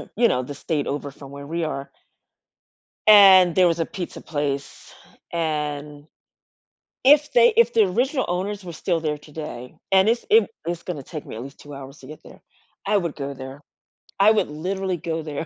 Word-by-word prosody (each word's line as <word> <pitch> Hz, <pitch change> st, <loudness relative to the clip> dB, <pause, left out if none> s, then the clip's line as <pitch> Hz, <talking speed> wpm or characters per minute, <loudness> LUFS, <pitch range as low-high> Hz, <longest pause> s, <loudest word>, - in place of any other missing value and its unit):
you 235 Hz, +2 st, +4 dB
know, 125 Hz, -, 0 dB
the 145 Hz, -, -7 dB
state 145 Hz, 0 st, -3 dB
over 145 Hz, 0 st, -4 dB
from 140 Hz, 0 st, -13 dB
where 140 Hz, 0 st, -9 dB
we 170 Hz, +2 st, -3 dB
are 140 Hz, -3 st, -4 dB, 1.2 s
and 190 Hz, -4 st, +8 dB
there 185 Hz, -1 st, +5 dB
was 165 Hz, 0 st, -1 dB
a 165 Hz, -, 0 dB
pizza 180 Hz, -3 st, -7 dB
place, 145 Hz, -2 st, -5 dB, 0.4 s
and 150 Hz, -2 st, -3 dB, 1.0 s
if 295 Hz, +2 st, +5 dB
they 480 Hz, -1 st, +5 dB
if 465 Hz, -, +4 dB
the 220 Hz, -2 st, +4 dB
original 260 Hz, -, 0 dB
owners 195 Hz, +3 st, -3 dB
were 175 Hz, -, -7 dB
still 165 Hz, +1 st, -2 dB
there 150 Hz, -2 st, -2 dB
today, 150 Hz, -5 st, -9 dB, 0.2 s
and 190 Hz, +2 st, +5 dB
it's 235 Hz, +1 st, 0 dB
it 445 Hz, +2 st, +5 dB, 0.2 s
it's 170 Hz, -1 st, -3 dB
gonna 165 Hz, -6 st, -6 dB
take 155 Hz, +2 st, -8 dB
me -, -, -8 dB
at 115 Hz, -, -6 dB
least 140 Hz, +2 st, -11 dB
2 145 Hz, -1 st, -11 dB
hours 135 Hz, +1 st, -10 dB
to 130 Hz, -, -14 dB
get 155 Hz, -, -11 dB
there, -, -, -15 dB, 0.4 s
I 205 Hz, +1 st, +2 dB
would 170 Hz, -5 st, -2 dB
go 140 Hz, -1 st, -5 dB
there. 130 Hz, +2 st, -10 dB, 0.6 s
I 205 Hz, +2 st, +6 dB
would 215 Hz, -, +1 dB
literally 185 Hz, +4 st, -3 dB
go 165 Hz, 0 st, -4 dB
there 150 Hz, +1 st, -5 dB
160 Hz, 190 wpm, -23 LUFS, 145-190 Hz, 1.2 s, and